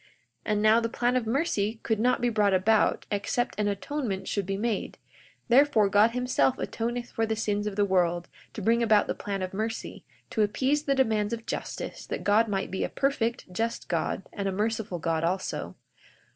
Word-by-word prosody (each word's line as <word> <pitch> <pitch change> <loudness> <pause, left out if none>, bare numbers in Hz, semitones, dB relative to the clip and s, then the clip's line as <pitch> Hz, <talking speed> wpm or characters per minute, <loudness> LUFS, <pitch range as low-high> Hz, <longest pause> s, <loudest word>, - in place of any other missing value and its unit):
42:15 - - -28 0.4
And 210 -1 +1
now, 215 +1 +6
the 230 0 -1
plan 245 +2 0
of 245 -3 0
mercy 225 -5 0
could 220 -2 0
not 250 +2 +2
be 245 - +2
brought 210 -4 +3
about 210 +3 +2
except 210 +4 -1
an 210 - +1
atonement 205 0 -3
should 200 -3 -2
be 195 0 -1
made; 220 0 -2 0.5
therefore 245 -5 +5
God 205 +3 +5
himself 250 +2 +1
atoneth 240 +1 -3
for 225 0 -1
the 220 - 0
sins 210 -1 -1
of 205 - -3
the 205 0 +3
world, 175 -3 +1 0.3
to 215 - -6
bring 230 +3 +3
about 220 -3 +4
the - - -2
plan 195 -2 -4
of 185 - -5
mercy, 220 +3 -4 0.3
to 220 - 0
appease 265 +8 +1
the 275 - +2
demands 220 -4 +1
of 225 -1 -5
justice, - - -5
that - - -4
God 215 +3 +4
might 195 -2 -2
be 190 - -2
a - - -1
perfect, 240 -7 -1
just 230 +5 -2
God, - - -1
and 200 -2 -3
a - - 0
merciful 210 -1 -2
God 165 -1 -1
also. 185 +3 -2
220 Hz, 200 wpm, -27 LUFS, 200-235 Hz, 0.5 s, now